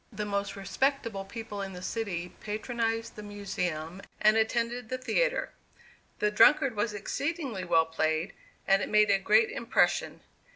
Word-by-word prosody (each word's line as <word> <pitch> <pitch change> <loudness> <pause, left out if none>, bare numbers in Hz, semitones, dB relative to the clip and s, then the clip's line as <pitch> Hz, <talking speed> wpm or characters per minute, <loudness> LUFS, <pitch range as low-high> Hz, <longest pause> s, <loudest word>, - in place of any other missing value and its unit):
The 210 -1 -4
most 200 -1 -2
respectable 225 0 -1
people 210 0 -6
in 195 -1 -5
the 180 0 -8
city 185 -6 -3
patronized 225 +1 -2
the 210 - -8
Museum 185 -4 -4 0.2
and 215 0 +5
attended 230 +1 0
the 255 - -2
theatre. - - 0 0.7
"The 210 - +1
Drunkard" 250 +3 +5
was 210 0 -1
exceedingly 275 - -3
well 165 -2 +4
played 160 +2 -1 0.3
and 195 0 +4
it - - -3
made 210 -1 +4
a 195 - +3
great 215 +3 +4
impression. 235 - +1
210 Hz, 150 wpm, -29 LUFS, 195-230 Hz, 0.7 s, and